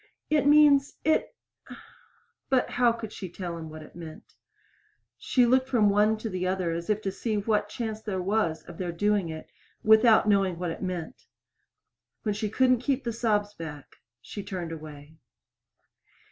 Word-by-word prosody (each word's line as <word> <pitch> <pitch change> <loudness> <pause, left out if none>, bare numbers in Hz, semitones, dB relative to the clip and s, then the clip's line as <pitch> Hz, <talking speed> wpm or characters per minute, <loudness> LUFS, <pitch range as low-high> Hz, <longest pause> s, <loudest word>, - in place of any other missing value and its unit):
"It 295 -2 +3
means! 290 -2 +5
It 315 - +1 0.6
" - - -33
But 260 -2 +2
how 245 -1 +3
could 230 -2 -7
she 190 - -7
tell 175 -1 -6
them 160 -1 -7
what 155 0 -9
it - - -16
meant? 165 -2 -11 0.8
She 250 -2 +2
looked 260 +2 +2
from 220 -5 +4
one 210 +2 +3
to 220 - -5
the 185 -3 -2
other, 185 -2 -1
as 170 +2 -4
if 215 0 0
to 195 - -1
see 215 +2 -2
what 205 0 0
chance 220 -1 -4
there 200 -4 -3
was 185 -4 0
of 175 - -12
their 180 -2 -2
doing 205 0 0
it 160 0 -8 0.3
without 220 0 +6
knowing 195 -4 +2
what 175 -1 -3
it - - -7
meant. 180 -4 -5 1.0
When 210 - 0
she 210 +1 -3
couldn't 255 +2 +3
keep 265 0 -1
sobs 215 -3 0
back, 150 -6 -9 0.3
she 205 - -7
turned 185 -4 -5
away. 155 -1 -10
205 Hz, 170 wpm, -27 LUFS, 175-230 Hz, 1.0 s, without